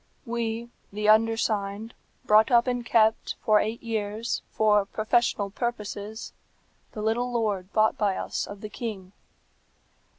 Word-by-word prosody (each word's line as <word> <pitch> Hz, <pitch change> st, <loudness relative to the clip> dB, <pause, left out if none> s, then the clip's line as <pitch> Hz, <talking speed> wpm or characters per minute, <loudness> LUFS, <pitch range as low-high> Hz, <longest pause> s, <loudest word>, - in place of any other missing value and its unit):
"We, 230 Hz, 0 st, -3 dB, 0.2 s
the 210 Hz, +1 st, -2 dB
undersigned, 220 Hz, -1 st, +1 dB, 0.3 s
brought 215 Hz, +1 st, +5 dB
up 240 Hz, -2 st, +5 dB
and 245 Hz, -1 st, -1 dB
kept, 220 Hz, -2 st, +2 dB
for 215 Hz, -1 st, +5 dB
eight 220 Hz, +2 st, -3 dB
years, 220 Hz, 0 st, -2 dB
for 210 Hz, -2 st, +3 dB
professional 215 Hz, -1 st, 0 dB
purposes, 215 Hz, -1 st, -5 dB, 0.6 s
the 210 Hz, -, -5 dB
little 240 Hz, +3 st, 0 dB
lord 205 Hz, -5 st, -1 dB
bought 215 Hz, 0 st, +2 dB
by 200 Hz, -3 st, +1 dB
us -, -, -3 dB
of 205 Hz, 0 st, -9 dB
the 215 Hz, -, -6 dB
king. 205 Hz, -4 st, -6 dB
220 Hz, 130 wpm, -26 LUFS, 210-230 Hz, 0.6 s, brought